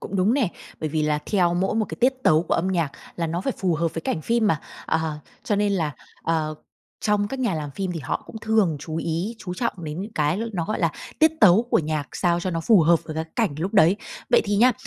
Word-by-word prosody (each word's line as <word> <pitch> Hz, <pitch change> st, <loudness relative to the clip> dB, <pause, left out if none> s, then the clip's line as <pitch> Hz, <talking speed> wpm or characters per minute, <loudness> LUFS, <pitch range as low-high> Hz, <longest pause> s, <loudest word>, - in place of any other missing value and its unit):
cũng 195 Hz, -, -4 dB
đúng 200 Hz, +7 st, +3 dB
nè. 255 Hz, -10 st, +2 dB, 0.3 s
Bởi 155 Hz, -, -1 dB
vì 155 Hz, 0 st, 0 dB
là 150 Hz, -1 st, +1 dB
theo 175 Hz, -4 st, +2 dB
mỗi 190 Hz, +4 st, 0 dB
một 220 Hz, -1 st, +2 dB
cái -, -, -7 dB
tiết 260 Hz, +2 st, +4 dB
tấu 155 Hz, -5 st, +4 dB
của -, -, -1 dB
âm 185 Hz, +3 st, +1 dB
nhạc 170 Hz, -6 st, 0 dB, 0.2 s
là 170 Hz, -1 st, -1 dB
nó 170 Hz, +2 st, -2 dB
phải 270 Hz, -, -1 dB
phù 180 Hz, -4 st, +1 dB
hợp 165 Hz, +1 st, -1 dB
với 165 Hz, -, -2 dB
cảnh 160 Hz, -, -2 dB
phim 230 Hz, +2 st, +2 dB
mà. 160 Hz, -7 st, +2 dB, 0.3 s
À, 160 Hz, -2 st, -1 dB, 0.2 s
cho 205 Hz, -, +1 dB
nên 205 Hz, 0 st, +2 dB
là, 160 Hz, -6 st, 0 dB, 0.3 s
ờ, 155 Hz, -2 st, 0 dB, 0.5 s
trong 205 Hz, -1 st, +1 dB
các 270 Hz, -, -5 dB
nhà 235 Hz, -9 st, +1 dB
làm 150 Hz, -2 st, -4 dB
phim 185 Hz, +4 st, -3 dB
thì 165 Hz, -, -4 dB
họ 135 Hz, -, -3 dB
cũng -, -, -9 dB
thường 215 Hz, -8 st, +2 dB
chú 160 Hz, 0 st, -5 dB
ý, 170 Hz, +7 st, -2 dB
chú 180 Hz, -1 st, -6 dB
trọng 235 Hz, +5 st, -1 dB
đến 150 Hz, +3 st, -4 dB
những 215 Hz, +2 st, -8 dB
cái 150 Hz, +5 st, +1 dB
nó, 170 Hz, -4 st, -1 dB
gọi 215 Hz, -, -2 dB
là, 165 Hz, -2 st, +3 dB, 0.3 s
tiết 315 Hz, +1 st, +5 dB
tấu 210 Hz, +2 st, +7 dB
của -, -, +4 dB
nhạc 155 Hz, -3 st, -2 dB
sao 175 Hz, -1 st, +1 dB
cho 185 Hz, -, -2 dB
nó 165 Hz, -1 st, -2 dB
phù 200 Hz, +2 st, +5 dB
hợp 165 Hz, +1 st, +4 dB
với 155 Hz, -, -6 dB
cái 160 Hz, 0 st, -2 dB
cảnh 220 Hz, -11 st, +1 dB
lúc 190 Hz, +6 st, -3 dB
đấy. 175 Hz, +2 st, +6 dB, 0.3 s
Vậy -, -, +6 dB
thì 205 Hz, 0 st, 0 dB
nhá, 250 Hz, +4 st, +6 dB
175 Hz, 260 wpm, -24 LUFS, 160-210 Hz, 0.5 s, tấu